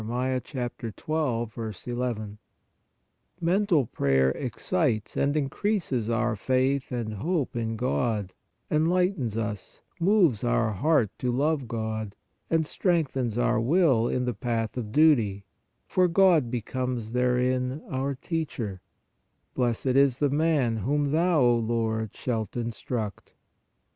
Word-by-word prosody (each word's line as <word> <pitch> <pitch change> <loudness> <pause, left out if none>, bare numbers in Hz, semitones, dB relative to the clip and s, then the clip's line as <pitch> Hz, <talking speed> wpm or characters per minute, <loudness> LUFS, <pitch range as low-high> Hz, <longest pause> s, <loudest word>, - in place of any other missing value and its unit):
12. 125 +1 -3
n)\ 110 0 -4 1.0
Mental 175 -4 +2
prayer 65 -8 +2
excites 110 - -1
and 145 +2 +1
increases 145 - -1
our 120 0 +1
faith 130 +5 0
and 115 -3 -3
hope 150 - -1
in 115 -1 -2
God, 110 -5 -1 0.4
enlightens 160 - +1
us, 105 -3 -4 0.2
moves 170 - +3
our 120 -2 +2
heart 135 - +2
to 125 - 0
love 140 +1 0
God, 110 -2 -4 0.3
and 165 -1 +2
strengthens 140 - 0
our 120 -2 +2
will 135 -4 +3
in 125 0 -1
the 125 - -1
path 115 -3 -2
of 115 -4 -4
duty, 115 -10 +3 0.4
for 185 -1 +2
God 175 -7 +4
becomes 120 -1 -3
therein 125 +2 +1
our 135 +1 -2
teacher: 130 - -4 0.7
Blessed 120 -2 -1
is 135 0 +4
the 145 -1 +1
man, 145 -6 +2
whom 140 +6 0
Thou, 165 0 +3
O 120 -1 +4
Lord, 110 -2 -1
shalt 115 -3 -3
instruct* 115 -2 -4
(Ps. - - -30
125 Hz, 120 wpm, -27 LUFS, 115-145 Hz, 1.0 s, God